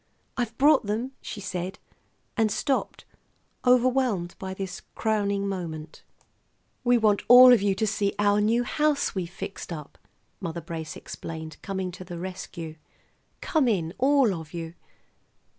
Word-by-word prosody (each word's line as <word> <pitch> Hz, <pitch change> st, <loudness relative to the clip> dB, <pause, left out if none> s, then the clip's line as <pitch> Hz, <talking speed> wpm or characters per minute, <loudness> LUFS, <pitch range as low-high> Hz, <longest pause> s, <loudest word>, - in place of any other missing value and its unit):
"I've 240 Hz, -3 st, -3 dB
brought 280 Hz, -5 st, +5 dB
them," 225 Hz, +5 st, -2 dB
she -, -, -7 dB
said, 185 Hz, -1 st, -4 dB, 0.6 s
and 220 Hz, -3 st, +2 dB
stopped, 270 Hz, +5 st, -1 dB, 0.6 s
overwhelmed 250 Hz, -7 st, +2 dB
by 190 Hz, -1 st, -5 dB
this 190 Hz, -1 st, -5 dB
crowning 200 Hz, -2 st, 0 dB
moment. 165 Hz, -5 st, -5 dB, 0.8 s
"We 245 Hz, 0 st, +4 dB
want 215 Hz, -3 st, +3 dB
you 245 Hz, -5 st, +8 dB
to 220 Hz, +3 st, 0 dB
see 205 Hz, -1 st, 0 dB
our 205 Hz, 0 st, +3 dB
new 230 Hz, +3 st, +2 dB
house 300 Hz, +3 st, +1 dB
we've 180 Hz, -3 st, -3 dB
fixed 185 Hz, +1 st, -7 dB
up," 150 Hz, -4 st, -8 dB, 0.4 s
Mother 170 Hz, -3 st, -4 dB
Brace 160 Hz, -1 st, -6 dB
explained, 160 Hz, -1 st, -7 dB
coming 190 Hz, -2 st, -3 dB
to 185 Hz, -, -9 dB
the 175 Hz, -1 st, -7 dB
rescue. 170 Hz, -3 st, -7 dB, 0.6 s
"Come 305 Hz, -6 st, +2 dB
in, 175 Hz, -7 st, 0 dB
all 270 Hz, -5 st, +4 dB
of 160 Hz, -1 st, -8 dB
you." 165 Hz, -1 st, -5 dB
200 Hz, 135 wpm, -26 LUFS, 175-240 Hz, 0.8 s, you